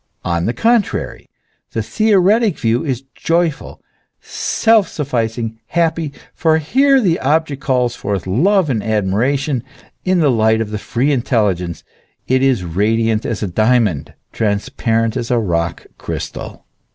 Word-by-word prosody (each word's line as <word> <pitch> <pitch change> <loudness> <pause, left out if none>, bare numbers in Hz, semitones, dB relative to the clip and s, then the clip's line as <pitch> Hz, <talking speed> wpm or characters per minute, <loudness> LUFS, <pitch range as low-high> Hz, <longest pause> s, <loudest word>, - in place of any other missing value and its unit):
On 85 0 0
the 115 - 0
contrary, 230 -2 0 0.4
the - - -1
theoretic 215 -1 +2
view 115 +1 0
is 135 -4 -3
joyful, 165 -2 -1 0.4
self 220 -4 +1
sufficing, 115 -6 -3
happy; 165 -2 0 0.2
for 160 -1 +2
here 270 - +3
the 180 -8 +1
object 145 0 0
calls 125 -3 0
forth 100 -2 -3
love 175 - +2
and 110 -4 0
admiration; 115 +7 0 0.4
in 185 -1 +2
the 150 -4 +3
light 110 -1 +3
of 110 -2 -3
the 105 - -3
free 125 +7 0
intelligence 105 - 0 0.4
it 130 +1 +2
is 130 -8 +2
radiant 110 +5 0
as 110 -2 -3
a - - -1
diamond, 110 - +1 0.2
transparent 110 +1 0
as 115 - -3
a 125 - +2
rock 85 -6 -1
crystal. - - -6
125 Hz, 135 wpm, -17 LUFS, 110-160 Hz, 0.4 s, here